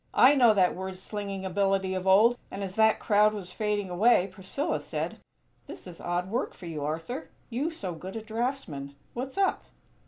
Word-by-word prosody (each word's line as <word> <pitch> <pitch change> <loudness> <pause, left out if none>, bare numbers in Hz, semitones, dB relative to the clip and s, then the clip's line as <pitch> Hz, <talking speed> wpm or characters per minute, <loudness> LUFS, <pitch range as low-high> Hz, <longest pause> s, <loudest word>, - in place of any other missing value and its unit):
I 260 +3 +8
know 240 -6 +5
that 185 -2 +3
word 190 0 -5
slinging 195 0 -5
ability 195 0 +1
of 185 0 -3
old" 215 +6 +6
and 200 - -5
as 190 -1 -4
that 220 +1 +4
crowd 210 0 +4
was 185 -3 -7
fading 210 -2 -1
away, 190 +1 +4
Priscilla 235 - -2
said: - - -4 0.5
"This - - -10
is 175 -2 -10
odd 175 +1 -1
work 245 +4 -1
for 180 - -11
you, 155 -4 -4
Arthur; 165 - -4 0.2
you 270 +7 0
so 200 - -5
good 185 +5 -8
a 225 - -3
draughtsman. 220 - -3 0.2
What's 260 +5 -5
up?" 390 -1 +1
200 Hz, 185 wpm, -28 LUFS, 185-235 Hz, 0.5 s, I